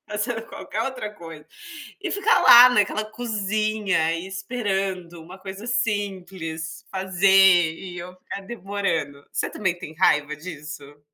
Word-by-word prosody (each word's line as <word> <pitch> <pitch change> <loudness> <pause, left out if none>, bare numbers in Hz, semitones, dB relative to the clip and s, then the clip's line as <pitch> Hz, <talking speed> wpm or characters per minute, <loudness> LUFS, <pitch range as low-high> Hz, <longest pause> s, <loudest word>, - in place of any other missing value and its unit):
fazendo 215 +2 -2
qualquer 220 - -5
outra 230 -4 -5
coisa. 165 -4 -11 0.6
E 380 - -2
ficar 405 +5 +3
lá 245 +1 +10
naquela 215 -2 +1
cozinha 215 -5 -1
e 170 +2 -5
esperando, 190 -4 -3
uma 180 +4 -12
coisa 195 +4 -8
simples, 185 -8 -3
fazer 190 -2 +4
e 180 +1 -9
eu 180 +1 -9
ficar 185 - -8
demorando. 195 -9 -3
Você - - -1
também 180 -4 -2
tem 160 -3 -9
raiva 150 -4 +2
disso? 150 -2 -9
190 Hz, 130 wpm, -23 LUFS, 170-210 Hz, 0.6 s, lá